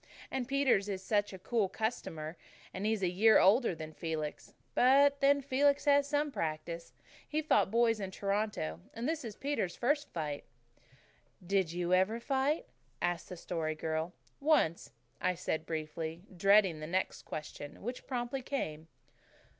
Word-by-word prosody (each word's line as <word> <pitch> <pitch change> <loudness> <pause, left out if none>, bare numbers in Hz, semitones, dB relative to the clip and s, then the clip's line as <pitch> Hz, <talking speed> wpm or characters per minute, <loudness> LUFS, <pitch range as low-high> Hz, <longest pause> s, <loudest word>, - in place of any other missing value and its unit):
And 260 -2 -2
Peter 275 -2 +4
is 195 -1 -4
such 205 +1 +1
a 190 - -7
cool 205 +1 0
customer, 180 -7 -3 0.4
and 195 +3 -2
he's 220 -3 0
a 175 - +2
year 220 +4 +6
older 205 0 +4
than 155 -1 -7
Felix. 155 -2 -4 0.2
But 280 +3 +5
then 280 0 +4
Felix 280 +2 +2
has 290 - +6
had 285 0 +5
some 295 0 +1
practice. 165 - -4 0.4
He 305 - -2
has 310 - 0
fought 310 - +4
boys 230 0 +3
in 195 -2 -3
Toronto. 195 - -2 0.2
And 235 +3 -3
this 320 -1 -1
is 220 -3 -6
Peter's 275 -11 -2
first 290 +4 0
fight." 150 -4 -3 1.0
"Did 190 -2 +1
you 175 +1 -1
ever 190 +5 +3
fight?" 275 - 0 0.3
asked 175 0 -1
the 180 - -7
Story 160 -2 -2
Girl. 160 +2 -2 0.3
"Once," 280 - +2 0.3
I 185 0 +1
said 160 -2 -3
briefly, 160 +1 -4
dreading 195 -2 +5
the 155 - -5
next 185 +3 -1
question, 150 0 -7
which 245 +3 -5
promptly 250 +1 -2
came. 160 - -4
195 Hz, 160 wpm, -33 LUFS, 165-260 Hz, 1.0 s, year